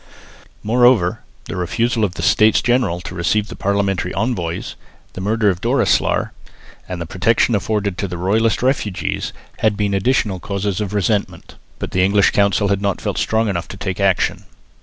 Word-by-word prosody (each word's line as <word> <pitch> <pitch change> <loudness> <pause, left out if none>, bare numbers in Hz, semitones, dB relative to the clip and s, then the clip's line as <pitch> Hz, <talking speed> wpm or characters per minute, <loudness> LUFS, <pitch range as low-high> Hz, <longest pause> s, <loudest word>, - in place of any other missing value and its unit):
Moreover 115 -5 +3 0.3
the - - -6
refusal 115 +6 0
of 95 -3 -1
the - - -5
States 110 0 +4
General 120 -8 +1
to 90 - -8
receive 100 +4 0
the - - -7
Parliamentary 100 -2 -1
envoys, 95 -7 -2 0.4
the 95 - -7
murder 105 +1 +2
of 90 - -6
Doreslaer, - - +1 0.6
and 90 -1 -4
the 85 - -4
protection 105 +8 +1
afforded 100 -2 -1
to 100 - -1
royalist 110 +7 +1
refugees, 125 -7 -1 0.3
had 110 -2 +1
been 100 -1 0
additional 100 -1 +1
causes 100 +1 -2
of 105 0 -3
resentment; 105 +1 -1 0.2
but - - -5
the 90 - +2
English 100 +1 +4
Council 100 0 +2
had 100 0 0
not 100 -1 -1
felt - - -3
strong 110 0 +1
enough 85 -4 -2
to 100 - -9
take 95 -1 -4
action. 95 -2 +1
100 Hz, 165 wpm, -19 LUFS, 95-110 Hz, 0.6 s, States